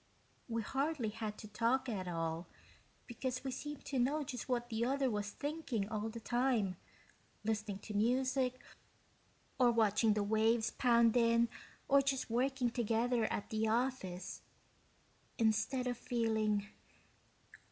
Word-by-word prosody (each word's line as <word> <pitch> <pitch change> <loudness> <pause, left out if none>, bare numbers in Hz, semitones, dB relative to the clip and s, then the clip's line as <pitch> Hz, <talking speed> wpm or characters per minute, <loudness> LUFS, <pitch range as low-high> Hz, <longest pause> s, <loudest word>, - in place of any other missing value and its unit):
We 230 -1 -1
hardly 270 0 -1
had 215 -1 -5
to 215 - -9
talk 235 +5 +1
at 195 -6 -3
all, 165 0 -2 0.6
because 250 +1 -4
we 265 - -2
seemed 295 +2 -6
to 270 -2 -1
know 290 +5 +2
just 250 -1 -6
what 240 -1 0
the 225 0 -1
other 265 +1 +1
one 210 - -1
was 205 0 -2
thinking 280 -6 -3
all 215 0 -2
the 230 +1 -7
time, 240 -5 +1 0.7
listening 215 -2 -1
to 215 - -6
music, 255 +3 +1 1.0
or 250 -1 +6
watching 220 -1 +3
the 210 - +1
waves 220 +2 +2
pound 235 -2 +4
in 230 -1 +4 0.4
or 280 0 +6
just 270 -3 -1
working 255 0 +1
together 235 0 +1
at 205 - -3
the 220 0 +1
office. 225 -6 -1 1.0
Instead 225 +4 +1
of 245 -1 -2
feeling 220 -3 +1
235 Hz, 140 wpm, -35 LUFS, 215-255 Hz, 1.0 s, or